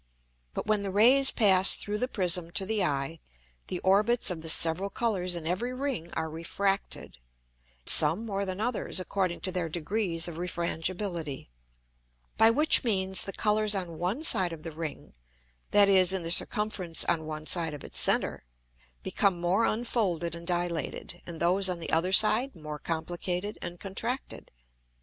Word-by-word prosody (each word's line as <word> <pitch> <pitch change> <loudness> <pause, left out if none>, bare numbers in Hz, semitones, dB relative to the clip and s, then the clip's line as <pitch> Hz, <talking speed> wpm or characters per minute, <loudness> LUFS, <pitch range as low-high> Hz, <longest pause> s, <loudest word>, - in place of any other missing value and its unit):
But - - -4
when 215 -1 +1
the 200 - -4
Rays 250 +8 +5
pass 190 -3 +5
through 210 0 -4
the 250 - -1
Prism 180 -6 -1
to 190 - +1
the 215 -1 -1
Eye, 145 +1 -2 0.5
the 185 - -4
Orbits 210 +4 +2
of 165 -3 -6
the 160 - -5
several 165 +5 +3
Colours 190 -6 -1
in 170 -2 -6
every 195 +9 -3
Ring 255 - -4
are 160 - -3
refracted, 170 - -3 0.7
some 160 +9 +4
more 200 -2 -3
than 190 0 -5
others, 225 -3 -2
according 185 -1 -2
to 185 - -2
their 180 -3 -3
degrees 170 +1 -2
of 170 -1 -8
Refrangibility: 170 - -4 0.9
By 225 - +6
which 300 +7 +4
means 190 -5 +1
the 195 - -4
Colours 215 0 +1
on 170 -4 -5
one 195 - -2
side 185 - +3
of 155 -2 -11
the 165 - -7
Ring 155 -1 -8 0.6
(that 205 -1 +6
is 190 -2 +5
in 190 -2 -3
the 165 - -3
circumference 190 -3 +2
on 160 -2 -1
one 155 0 -6
side 165 -2 +1
of 145 - -11
its - - -3
center), - - +1 0.6
become 195 -4 0
more 180 +6 +1
unfolded 205 -7 -1
and 170 0 -9
dilated, 175 -1 -3
and 170 -2 -8
those 185 +3 +2
on 180 -1 -3
the 165 - -5
other 170 +3 +1
side 220 +6 +5
more 150 -2 -8
complicated 175 +5 -4
and 175 0 -7
contracted. 230 +7 -5
185 Hz, 165 wpm, -28 LUFS, 170-210 Hz, 0.9 s, By